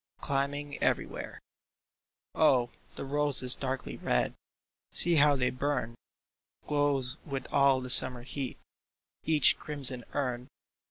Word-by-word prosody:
Climbing 140 +1 -4
everywhere! - - -3 0.9
Oh, 130 -6 +1 0.2
the - - -7
roses 140 -3 +2
darkly 130 -1 -4
red - - -2 0.3
— - - -44
See, 170 -2 +6
how 145 0 +3
they 125 -2 -1
burn! 130 -3 -4 0.7
Glows 145 -3 -2
with 135 -4 -7
all 140 -2 +2
the 125 0 -2
summer 125 -1 +7
heat 130 0 -7 0.7
Each 155 -4 +3
crimson 135 -4 +2
urn. 125 -3 -4
135 Hz, 115 wpm, -28 LUFS, 125-145 Hz, 0.9 s, summer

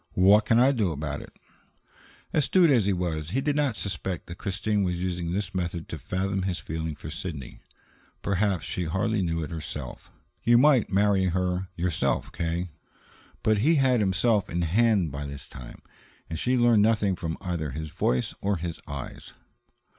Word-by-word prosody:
"What 100 +3 +6
can 115 - +3
I 130 +3 +6
do 110 -9 +1
about 75 -1 -4
it?" - - -12 1.0
Astute 165 +2 +4
as 115 -7 +3
he - - +3
was, 85 -4 -2
he 120 +9 0
did 145 +1 0
not 145 -5 +1
suspect 95 -3 -3
that 85 +1 -9
Christine 105 +2 -1
was 90 -2 0
using 90 -2 -2
this 95 0 -2
method 85 -2 -3
to 80 - -5
fathom 95 +6 -2
his 90 -2 -1
feeling 80 -1 -4
for - - -8
Sidney. 75 -9 -6 0.6
Perhaps 100 -2 0
she 90 - -3
hardly 100 +6 0
knew 80 -2 -1
it 75 - -6
herself. 80 -2 -6 0.3
"You 120 +1 +5
might 135 -2 +5
marry 100 -1 +3
her 90 +1 0
yourself, 85 -2 0
K." 85 +2 -2 0.7
But 110 -1 +3
he 155 +10 +4
had 130 -4 +3
himself 100 +1 +2
in 85 +1 -1
hand 100 -1 +2
by 70 +1 -5
this 70 0 -8
time, 65 -2 -11 0.4
and 80 - -5
she 125 +1 +1
learned 120 -3 +5
nothing 105 -3 +3
from 80 -2 -4
either 85 -4 -3
his 80 +3 -6
voice 65 0 0
or 100 -1 +1
his 85 0 -5
eyes. 70 -2 -7
95 Hz, 175 wpm, -27 LUFS, 85-105 Hz, 1.0 s, What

